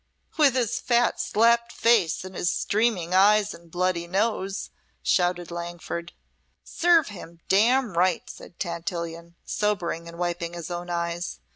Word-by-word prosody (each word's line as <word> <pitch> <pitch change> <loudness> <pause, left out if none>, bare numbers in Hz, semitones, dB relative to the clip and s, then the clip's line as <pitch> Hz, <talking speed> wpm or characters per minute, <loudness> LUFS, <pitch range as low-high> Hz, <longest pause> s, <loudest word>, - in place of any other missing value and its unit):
"With 290 -5 +4
his 240 -2 0
fat, 240 -1 +2
slapped 235 +2 +3
face 225 -11 +2
and 185 - -9
his 175 - 0
streaming 200 -6 0
eyes 205 +2 +4
and 170 0 -15
bloody 175 0 -1
nose!" 195 0 -1 0.3
shouted 175 -1 +1
Langford. 170 0 -6 0.5
"Serve 340 -5 +3
him 170 -4 -11
damn 230 +1 +3
right!" 180 0 +1
said 175 - -12
Tantillion, 170 -1 -5
sobering 185 -5 -1
and 170 0 -10
wiping 175 -1 -2
his 175 0 -7
own 175 0 -5
eyes. 170 0 -3
180 Hz, 135 wpm, -25 LUFS, 170-215 Hz, 0.5 s, With